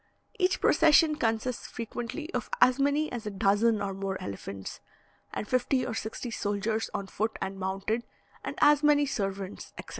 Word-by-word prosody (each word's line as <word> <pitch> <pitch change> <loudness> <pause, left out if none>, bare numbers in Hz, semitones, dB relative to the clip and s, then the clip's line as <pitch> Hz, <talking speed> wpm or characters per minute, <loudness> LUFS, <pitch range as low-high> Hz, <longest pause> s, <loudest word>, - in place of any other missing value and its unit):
Each 370 0 +2
procession 315 0 +5
consists 230 -1 -1
frequently 240 - -5
of - - -2
as 255 +1 +5
many 285 +2 +2
as 235 -3 -5
a - - 0
dozen 205 +2 +2
or 195 -1 -2
more 195 0 -3
elephants, 100 -1 -6 0.5
and 210 - -4
fifty 255 0 +1
or 245 - -3
sixty 225 +2 -4
soldiers 215 +1 -1
on 200 - -3
foot 220 +3 -2
and 195 0 -4
mounted, 195 +5 -1 0.4
and - - -4
as 295 -1 +6
many 295 -1 +4
servants, 195 -7 -4
etc. - - -8
225 Hz, 160 wpm, -29 LUFS, 195-275 Hz, 0.5 s, as